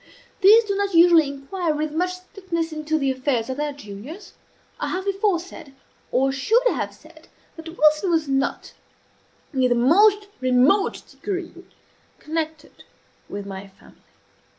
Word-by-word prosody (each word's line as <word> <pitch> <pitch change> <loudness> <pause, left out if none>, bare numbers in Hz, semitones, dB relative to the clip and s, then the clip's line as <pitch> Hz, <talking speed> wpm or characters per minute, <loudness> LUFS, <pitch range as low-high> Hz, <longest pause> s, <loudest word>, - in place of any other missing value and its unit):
These 435 +4 +7
do 400 -2 -2
not 400 -2 -1
usually 335 -2 +6
inquire 300 +4 -3
with 305 0 -2
much 360 +4 -1
strictness 365 -3 -5
into 310 0 -1
the 275 -3 0
affairs 260 -2 -1
of 260 - -5
their 295 0 -2
juniors. 275 - -10 0.5
I - - -2
have 375 +1 -3
before 395 -2 +1
said, 330 -5 -12 0.4
or 270 +2 +2
should 425 - +2
have - - -3
said, 315 0 -18 0.3
that 325 +1 -10
Wilson 305 +4 +3
was 325 -3 +1
not 270 0 -2 0.8
in 265 - -2
the 250 -1 +3
most 405 - +4
remote 255 +10 +2
degree 370 -4 -5 0.7
connected 315 -1 -5 0.5
with 200 0 -6
my 195 0 -8
family. 195 0 -21
315 Hz, 145 wpm, -23 LUFS, 270-370 Hz, 0.8 s, These